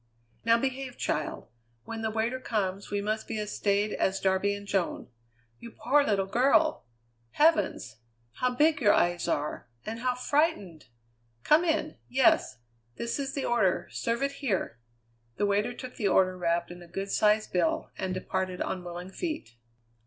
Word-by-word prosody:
"Now 230 0 +5
behave, 265 0 -3
child! 150 - -2 0.4
When 225 - -6
the 220 - 0
waiter 225 +4 -1
comes 200 -5 -2
we 205 0 -1
must 215 +1 -2
be - - -3
as 210 -1 -4
staid 205 +1 +1
as 190 0 0
Darby 195 +1 +1
and 200 0 -9
Joan. 195 -9 -1 0.5
You 235 - -9
poor 260 +6 +2
little 200 -6 +1
girl! 260 - +3 0.5
Heavens! 300 - +2 0.4
how 250 0 0
big 295 +1 +3
your 205 -4 +6
eyes 175 0 +1
are, 145 -3 -2 0.2
and 225 +1 -4
how 250 +1 0
frightened! 250 - 0 0.6
Come 310 +3 +5
in! 315 -2 0
Yes. 250 - +3 0.4
This 235 +4 -3
is 275 0 -3
the 275 - -2
order; 210 -6 +1
serve 235 +3 -1
it 275 - +1
here." 190 - -1 0.6
The 205 - +1
waiter 205 +4 +1
took 250 +1 -9
the 210 - +1
order 185 -1 +3
wrapped 170 -1 -1
in 175 0 -10
a 175 - -12
good 195 +3 -5
sized 215 0 +2
bill, 175 -3 0
and 190 - -3
departed 185 0 -2
on 185 - -3
willing 175 +1 -7
feet. 310 - -4
210 Hz, 165 wpm, -28 LUFS, 185-255 Hz, 0.6 s, your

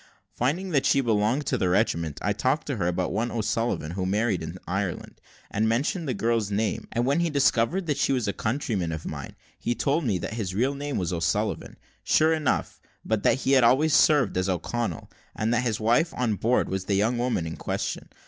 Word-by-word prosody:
Finding 170 +10 -1
that 140 -4 +2
he 140 - +4
belonged 115 +4 +1
to 125 - 0
the 90 - +1
regiment, 85 -6 0
I 105 - +1
talked 130 +8 0
to 140 - -2
him 105 - -5
about 90 +1 -1
one 120 +2 0
O'Sullivan 115 -7 -1
who 95 +1 -2
married 105 -1 +1
in 80 +3 -6
Ireland, 95 -1 -3 0.3
and 110 +2 +1
mentioned 145 +8 0
the 130 - -1
girl's 115 -1 0
name, 105 +1 -1
and 120 +2 0
when 140 +5 +2
he 170 -1 +1
discovered 140 +4 +2
that 145 -3 -1
she - - +2
was 125 -5 0
a 100 - 0
countryman 110 - -2
of 80 -1 -5
mine, - - -6 0.2
he 120 - -1
told 140 +8 0
me 110 -8 +1
that 90 - -5
his 100 -5 -3
real 130 +6 +1
name 145 0 -4
was 90 -1 -1
O'Sullivan, 85 -1 -1 0.3
sure 160 +1 +3
enough, 155 -4 -1 0.2
but 110 -2 0
that 135 - +2
he 135 - 0
had 135 -2 +5
always 145 +6 +4
served 145 -11 +4
as 95 +1 0
O'Connell, 95 +1 -2 0.3
and 110 +2 0
that 120 - +2
his 115 -4 -1
wife 120 +10 +2
on 120 -3 +1
board 115 +5 +1
was 95 0 -3
the 100 - 0
young 115 +5 +1
woman 120 -9 0
in 80 - -5
question. - - -4
115 Hz, 215 wpm, -26 LUFS, 100-135 Hz, 0.3 s, had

